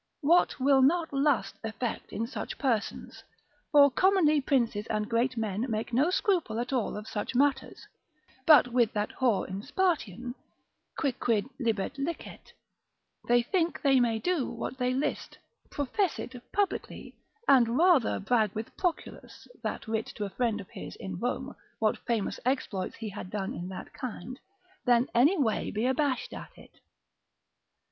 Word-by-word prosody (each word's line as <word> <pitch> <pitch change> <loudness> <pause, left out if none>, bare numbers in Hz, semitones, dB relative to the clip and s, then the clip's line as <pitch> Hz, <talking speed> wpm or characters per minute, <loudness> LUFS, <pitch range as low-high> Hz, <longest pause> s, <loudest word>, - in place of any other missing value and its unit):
what 335 +2 +3
will 270 0 +4
not 320 +3 +2
lust 275 -2 +1
effect 225 +1 -4
in 225 - -2
such 235 - -6
persons? 230 -6 -2 0.5
For 285 -2 +7
commonly 335 -3 +4
princes 235 -6 0
and 210 -1 -1
great 240 +2 0
men 220 +2 -1
make 220 +1 -3
no 275 +8 +3
scruple 360 - 0
at 245 +3 -3
all 240 -5 -1
of 210 +1 -8
such 210 +3 -4
matters, 270 0 +1 0.6
but 295 -6 +8
with 240 -2 +2
that 210 0 -1
whore 245 -6 +1
in 190 +2 -5
Spartian, 250 - -1 0.6
quicquid 235 -7 0
libet 230 +2 -1
licet, 325 +5 -5 0.8
they 240 0 +4
think 340 +5 -1
they 270 -2 +5
may 235 -2 +2
do 335 +2 0
what 260 - -5
they 250 0 +1
list, 265 +3 -2 0.3
profess 300 +6 -1
it 255 - -6 0.2
publicly, 405 0 -2 0.3
and 245 -3 +5
rather 335 -7 +4
brag 215 -1 +2
with 220 +1 -6
Proculus 355 -3 -4
(that - - -4
writ 220 0 -1
to 210 - -3
a 200 - -6
friend 230 0 0
of 190 - -10
his 90 0 -8
in 95 -2 -6
Rome, - - -3 0.2
what 215 -1 +1
famous 230 -4 -1
exploits 235 -7 -1
he 225 -2 -6
had 195 -2 -7
done 195 -1 -3
in 175 - -5
that 185 - -8
kind) 255 -1 -7 0.4
than 245 0 +3
any 280 +11 +4
way 235 -8 0
be 215 +3 -1
abashed 260 0 0
at - - -10
it. - - -17
245 Hz, 155 wpm, -29 LUFS, 220-285 Hz, 0.8 s, but